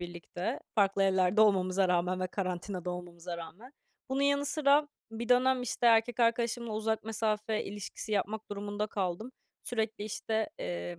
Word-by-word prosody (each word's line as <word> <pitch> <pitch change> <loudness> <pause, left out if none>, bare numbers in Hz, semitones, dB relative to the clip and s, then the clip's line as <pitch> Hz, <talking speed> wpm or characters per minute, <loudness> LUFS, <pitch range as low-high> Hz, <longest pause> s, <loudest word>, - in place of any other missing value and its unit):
birlikte, 175 +6 -4
farklı 195 -3 +3
evlerde 190 +1 +3
olmamıza 190 -2 +4
rağmen 180 +1 +1
ve 185 - 0
karantinada 180 -1 -3
olmamıza 175 -1 -6
rağmen. 175 - -10 0.4
Bunun 265 +1 0
yanı 280 0 +2
sıra 290 0 +3 0.2
bir 225 +1 -5
dönem, 250 0 +4
işte, 245 0 0
erkek 230 +1 +4
arkadaşımla 235 0 +1
uzak 220 0 -1
mesafe 215 -1 -1
ilişkisi 205 +2 -6
yapmak 210 +2 -1
durumunda 205 +1 -3
kaldım. 200 +3 -3 0.3
Sürekli, 220 -3 -2
işte, 220 +1 -2
eee, 85 0 -4
210 Hz, 140 wpm, -31 LUFS, 185-230 Hz, 0.4 s, olmamıza